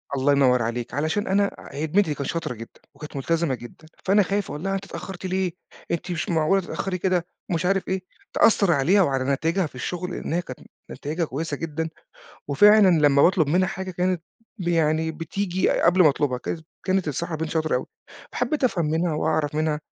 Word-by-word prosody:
الله 135 +2 +2
ينور 130 -3 +4
عليك، 115 +1 -3
علشان 160 +8 -1
أنا 200 +1 +2 0.2
هي 140 +2 -4
البنت 190 +6 +3
دي 155 - -1
كانت 140 - -4
شاطرة 165 -7 -2
جدًا 115 0 -12
وكانت 150 -1 -10
مُلتزمة 160 0 0
جدًا، 120 +6 -13 0.2
فأنا 200 +1 +5
خايِف 200 +1 -2
أقول 150 - -6
لها 195 0 -1
أنتِ 195 0 -4
اتأخرتِ 190 -1 -7
ليه، 185 -1 0 0.4
أنتِ 170 +1 -2
مش 170 0 -3
معقولة 165 +4 +2
تتأخري 185 +1 -3
كده 180 -1 0 0.3
مش 170 +1 0
عارِف 195 0 +1
إيه، 190 0 -1 0.3
تأثر 200 -4 +4
عليها 170 +7 +4
وعلى 135 -6 +1
نتايجها 165 +6 0
في - - -18
الشغل، 180 +8 -4
لأن 170 - -4
هي 175 - +1
كانت 130 -7 -9 0.3
نتايجها 160 +4 -3
كويسة 150 +1 -4
جدًا. 160 +1 -3 0.6
وفعلًا 205 +8 +6 0.2
لمّا 140 0 +4
باطلب 170 -3 +4
منها 185 +5 +2
حاجة 190 0 -5
كانت 180 0 0 0.4
ب 175 - -4
يعني 160 -1 +2
بتيجي 180 +4 -1
أ - - +1
قبل 180 +2 +5
ما 155 - +7
أطلبها، 135 -3 0
ك 160 - -4 0.3
كانت 190 -2 +1
الصراحة 160 +3 -2
بنت 160 0 -3
شاطرة 155 -2 0
أوي. 125 - -1 0.5
حبّيت 305 -3 -1
أفهم 185 -10 +2
منها 160 +2 0
وأعرِف 150 -1 0
منها 155 -1 0
165 Hz, 195 wpm, -24 LUFS, 150-185 Hz, 0.6 s, ما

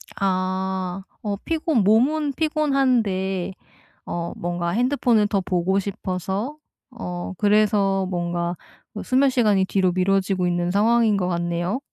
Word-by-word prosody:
아, 185 -1 -1 0.2
어 205 -2 -2
피곤 320 - +1
몸은 275 +8 +3
피곤한데 250 - 0 0.5
어 170 0 -4
뭔가 175 0 -3
핸드폰을 240 0 +2
더 205 -1 0
보고 185 +1 0
싶어서 195 - -4 0.3
어 180 -7 -6
그래서 205 -2 +2
뭔가 175 -1 -2 0.4
그 210 - -6
수면 270 +2 +3
시간이 210 -7 +2
뒤로 190 -1 +1
미뤄지고 185 0 +1
있는 175 0 0
상황인 220 +2 +3
것 180 -2 -1
같네요. 175 +5 -1
195 Hz, 250 characters per minute, -23 LUFS, 180-230 Hz, 0.5 s, 몸은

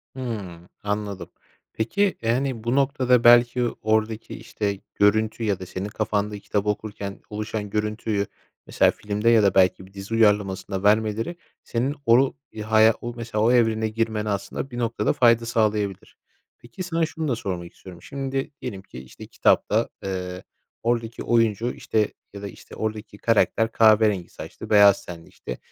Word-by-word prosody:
Hımm, 100 -9 -6
anladım, 105 -1 -4 0.4
peki, 190 - 0
yani, 120 0 -1
bu 120 +3 0
noktada, 130 -3 +2
belki, 120 +1 +6 0.2
oradaki, 110 +1 0
işte, 100 -2 -4 0.2
görüntü 110 +3 +2
ya 100 -4 0
da 95 - -7
senin 95 +2 -5
kafanda 105 -1 -2
kitap 100 +1 -2
okurken 105 -1 -4
oluşan 105 0 -4
görüntüyü, 105 0 -1 0.4
mesela, - - +3
filmde 105 +2 -1
ya 115 -3 +5
da, 100 - +3
belki, 95 0 +3
bir 95 - -19
dizi 100 +2 -7
uyarlamasında 105 -3 +1
vermeleri 110 +7 +2 0.3
senin 130 +5 -1
oru 125 +3 +4 0.2
ya 110 0 -8
haya 110 0 +6 0.2
mesela, 115 -2 -3
o 115 - +4
evrene 110 -2 +2
girmene 110 -1 -1
aslında, 100 +6 -3
bir 120 - -7
noktada, 115 -1 0
fayda 115 -1 +4
sağlayabilir. 105 -4 -1 0.4
Peki, 120 +10 -9
sana 165 -2 0
şunu 160 0 -4
da 125 - +1
sormak 90 -5 -5
istiyorum. 90 -2 -13
Şimdi, 135 - -4
diyelim 100 -7 -5
ki, 65 -9 -11
işte, 65 - -12
kitapta, - - +2
eee, 90 -1 -4 0.4
oradaki 115 -1 -1
oyuncu, 115 0 +2
işte, 110 -1 -1 0.2
ya 100 - -8
da, 100 - -5
işte, 100 - -12
oradaki 110 -1 -5
karakter 115 0 +2
kahverengi 110 -5 +4
saçlı, - - -10
beyaz 100 -2 +6
tenli, 85 -2 -10
işte, 60 - -8
110 Hz, 150 wpm, -24 LUFS, 100-115 Hz, 0.4 s, belki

